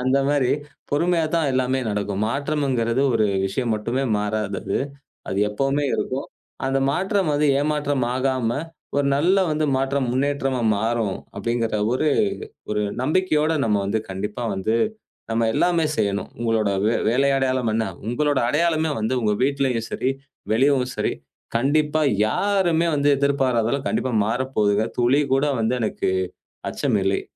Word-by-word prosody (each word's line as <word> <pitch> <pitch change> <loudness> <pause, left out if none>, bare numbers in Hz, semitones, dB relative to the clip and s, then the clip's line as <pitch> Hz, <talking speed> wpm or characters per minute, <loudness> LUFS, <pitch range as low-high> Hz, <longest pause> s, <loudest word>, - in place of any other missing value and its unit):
அந்த 130 +2 +2
மாதிரி 145 -3 +2 0.4
பொறுமையா 165 +2 +2
தான் 160 -4 +2
எல்லாமே 130 0 +1
நடக்கும். 100 -1 -2
மாற்றம்ங்கறது 135 -3 0
ஒரு 110 -1 +3 0.2
விஷயம் 115 +4 -1
மட்டுமே 120 +5 -2 0.2
மாறாதது. 105 -1 -2 0.5
அது 95 - -2
எப்பவுமே 135 +6 0
இருக்கும். 130 +2 -2 0.4
அந்த 135 0 +1
மாற்றம் 190 +2 0
வந்து 150 +1 +2
ஏமாற்றம் 145 -3 0
ஆகாம 130 -3 0 0.5
ஒரு 145 - +2
நல்ல 180 +7 +3
வந்து 155 0 0
மாற்றம் 135 -1 0
முன்னேற்றமா 135 -1 0 0.2
மாறும். 110 -2 -1 0.2
அப்படிங்கிற 115 +1 -1
ஒரு 130 +5 0 0.7
ஒரு 105 - 0 0.2
நம்பிக்கையோட 155 +1 +2
நம்ம 105 -2 +2
வந்து 110 +2 0
கண்டிப்பா 105 +5 -4
வந்து 95 +4 0 0.5
நம்ம 115 0 +1
எல்லாமே 170 -3 +2
செய்யணும். 100 -2 -1
உங்களோட 115 -3 +1 0.2
வே 115 - +2
வேலை 135 +4 +3
அடையாளம் 130 -4 0
என்ன? 115 0 +1 0.2
உங்களோட 145 +4 +1
அடையாளமே 160 +1 +1
வந்து 110 +4 -1
உங்க 105 -1 +2
வீட்டிலேயும் 135 -4 0
சரி, 130 - 0 0.4
வெளியவும் 130 +1 +2
சரி - - 0 0.4
கண்டிப்பா 150 +5 +2 0.3
யாருமே 175 - +1
வந்து 145 0 +2
எதிர்பாராததெல்லாம் 135 -2 +1
கண்டிப்பா 130 - -1
மாறப்போகுது. 110 -3 +1
துளி 125 +4 +3
கூட 135 +2 +2
வந்து 115 +3 +1
எனக்கு 110 -3 -1 0.6
அச்சமில்லை. - - 0
130 Hz, 130 wpm, -23 LUFS, 115-145 Hz, 0.7 s, ஒரு